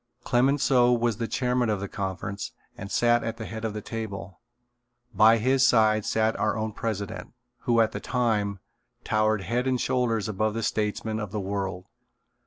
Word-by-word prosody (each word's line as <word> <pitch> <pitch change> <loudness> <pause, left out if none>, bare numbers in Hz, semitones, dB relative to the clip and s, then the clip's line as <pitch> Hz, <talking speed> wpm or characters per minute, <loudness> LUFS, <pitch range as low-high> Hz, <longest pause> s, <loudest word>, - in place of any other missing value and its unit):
Clemenceau 125 -1 +3
was 120 -2 +1
the 115 -1 -2
chairman 125 -2 0
of 105 -2 0
the 100 - -4
conference 95 +1 -4 0.2
and 100 - -8
sat 120 0 +3
at 115 0 -4
the 110 - -6
head 110 0 -7
of 110 -2 -3
the 105 - -5
table. 100 -5 -6 0.7
By 110 +3 +6
his 130 +4 +2
side 110 -4 +4
sat 110 0 +1
our 110 +1 +1
own 110 0 -2
president, 100 -2 -4 0.3
who 120 -1 +3
at 110 - +2
that - - -5
time, 105 -6 0 0.4
towered 110 -1 +1
head 120 +5 -1
and 130 -1 +1
shoulders 120 -5 0
above 110 +1 -1
the 115 - -2
statesmen 110 +1 -1
of 105 -3 -4
the 105 - -2
world. 95 -2 -3
110 Hz, 175 wpm, -26 LUFS, 105-120 Hz, 0.7 s, By